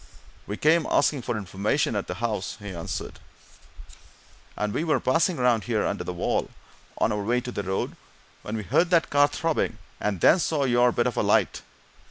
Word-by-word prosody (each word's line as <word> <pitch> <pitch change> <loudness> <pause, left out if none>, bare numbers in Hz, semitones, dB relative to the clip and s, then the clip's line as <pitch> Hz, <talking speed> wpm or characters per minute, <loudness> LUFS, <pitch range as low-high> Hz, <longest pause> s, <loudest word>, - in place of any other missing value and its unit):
"We 105 - -4
came 160 +4 +3
asking 145 -4 +2
some 120 - -3
information 105 +6 -1
at 100 - -2
the 90 - -4
house," 110 -3 -3
he 100 -1 -7
answered, 85 -2 -5 1.4
"and 105 -1 -1
we - - -1
were 160 -2 +2
passing 165 +6 +1
round 125 -3 +2
here, 115 -3 0
under - - -2
the - - -4
wall, 90 - -1 0.5
on - - +2
our 105 -1 -1
way 120 +4 +1
to 125 0 -6
the 100 - -3
road, 95 -1 -3 0.5
when 110 +1 -4
we 105 - -4
heard 165 - +2
that 170 -2 +2
car 145 0 +5
throbbing, 160 +2 -1 0.2
and 100 -3 -1
then 175 - +5
saw 155 -3 0
your 120 -1 +3
bit - - 0
of - - -1
a - - +3
light. - - +2
120 Hz, 195 wpm, -25 LUFS, 105-145 Hz, 1.4 s, car